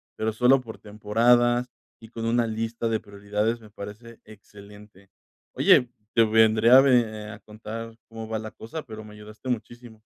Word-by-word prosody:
pero 110 0 -2
solo 125 +4 +4
por 115 -3 -11
temporadas 120 +4 +2 0.3
y 110 - -13
con 115 -1 -6
una 115 0 +1
lista 115 +1 -3
de 110 -1 0
prioridades. 105 +3 -3
Me 105 - -15
parece 105 +3 -11
excelente. 105 -2 -16 0.4
Oye, 125 - +4 0.3
te 115 - +6
vendré 110 +1 +4
a 130 +1 +9
ve 110 -5 +1
a 105 - -9
contar 110 +2 -9
cómo 115 0 -8
va 110 0 -3
la 110 0 -7
cosa, 150 +10 -8
pero 110 -3 -10
me 105 - -13
ayudaste 105 +4 -11
muchísimo. 120 -1 -6
110 Hz, 165 wpm, -25 LUFS, 105-115 Hz, 0.4 s, a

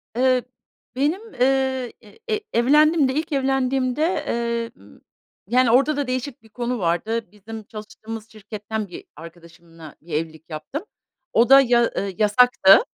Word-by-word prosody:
Eee, 255 0 +3 0.5
benim, 345 - -1
eee, 260 -1 +1 0.4
e 430 -1 +1
evlendiğimde 290 +3 +4
ilk 310 +4 -2
evlendiğimde, 265 -1 0 0.3
eee, 235 0 -2
m, 100 - -18 0.5
yani, 245 +2 +3
orada 275 +5 +3
da 285 -2 -1
değişik 255 -1 -4
bir 220 - -19
konu 240 +2 -3
vardı. 185 +4 -1
Bizim 215 +2 -9
çalıştığımız 215 +1 -9
şirketten 215 0 -6
bir 180 - -10
arkadaşımla 165 -1 -13
bir 165 +1 -11
evlilik 160 +1 -4
yaptım. 165 - -6 0.5
O 235 +2 +4
da 270 0 +9
ya 240 -2 +3
ı 200 -4 -2
yasaktı. 210 -2 +6
235 Hz, 135 wpm, -22 LUFS, 210-265 Hz, 0.5 s, da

